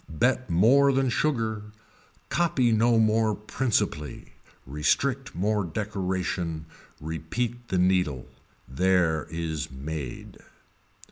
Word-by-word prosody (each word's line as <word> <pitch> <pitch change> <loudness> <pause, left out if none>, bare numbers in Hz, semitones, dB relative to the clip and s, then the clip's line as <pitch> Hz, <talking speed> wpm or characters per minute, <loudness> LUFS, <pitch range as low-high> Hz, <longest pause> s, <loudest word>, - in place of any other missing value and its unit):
Bet 125 +9 +1
more 125 +11 +5
than 135 -1 +1
sugar, 115 -6 0 0.7
copy 150 -8 +2
no 115 +1 +4
more 110 -1 +3
principally, 105 - -2 0.3
restrict 125 - 0
more 105 +3 +1
decoration, 90 -3 -3 0.3
repeat 115 +11 -4
the 95 - -1
needle. 90 -7 +1 0.4
There 85 +1 +1
is 80 -2 -3
made. 70 -1 -7
95 Hz, 90 wpm, -26 LUFS, 80-120 Hz, 0.7 s, more